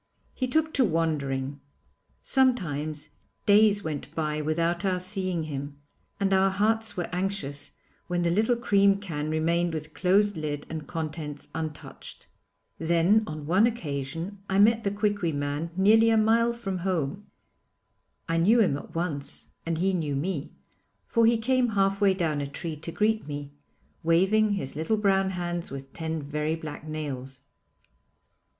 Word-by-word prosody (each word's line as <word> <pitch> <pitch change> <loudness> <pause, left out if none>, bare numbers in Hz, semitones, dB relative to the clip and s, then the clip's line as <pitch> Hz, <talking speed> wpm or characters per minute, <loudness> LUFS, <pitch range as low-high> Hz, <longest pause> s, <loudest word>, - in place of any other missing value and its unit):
He 255 - -2
took 315 +4 +1
to 265 - +4
wandering. 145 - -1 0.6
Sometimes 155 - 0 0.4
days 205 0 +5
went 155 0 -5
by 155 -1 -1
without 170 +4 0
our 190 -2 +1
seeing 185 -2 -1
him, 140 -1 -5 0.4
and 195 -1 +2
our 190 0 +4
hearts 220 +2 0
were 175 - -1
anxious 180 -7 -3 0.3
when 175 0 0
the 170 - +2
little 220 +6 +3
cream 200 -4 +3
can 155 -6 -4
remained 165 +2 +1
with 155 0 -6
closed 200 +3 +3
lid 150 -2 -3
and 155 -2 -5
contents 155 -2 -5
untouched. 155 -2 -7 0.5
Then 170 +6 +3
on 155 -1 -6
one 185 +8 +4
occasion 165 - -4
I 190 - +1
met 220 +2 +5
the 200 - +1
Quiqui 205 -4 0
man 145 +3 -2
nearly 220 +4 +6
a 225 - +4
mile 230 +2 +4
from 195 -6 -4
home. 180 0 -2 1.0
I 165 -1 0
knew 210 +8 +5
him 185 -11 +3
at - - -13
once 145 -5 -4 0.2
and 165 -1 0
he 190 +3 +1
knew 155 -6 -1
me, 155 0 -3 0.5
for 230 -1 +3
he 230 0 +4
came 250 +2 +2
half 195 +1 +2
way 195 -2 +4
down 160 -5 0
a 140 - -3
tree 160 +3 -5
to 160 +3 -7
greet 215 0 +1
me, 145 -1 -6 0.5
waving 195 +6 +3
his 140 -10 -3
little 160 +9 0
brown 195 -2 +2
hands 175 -2 -3
with 135 0 -8
ten 160 -2 -3
very 150 +2 -1
black 155 -1 -8
nails. 135 -4 -5
170 Hz, 155 wpm, -27 LUFS, 150-205 Hz, 1.0 s, nearly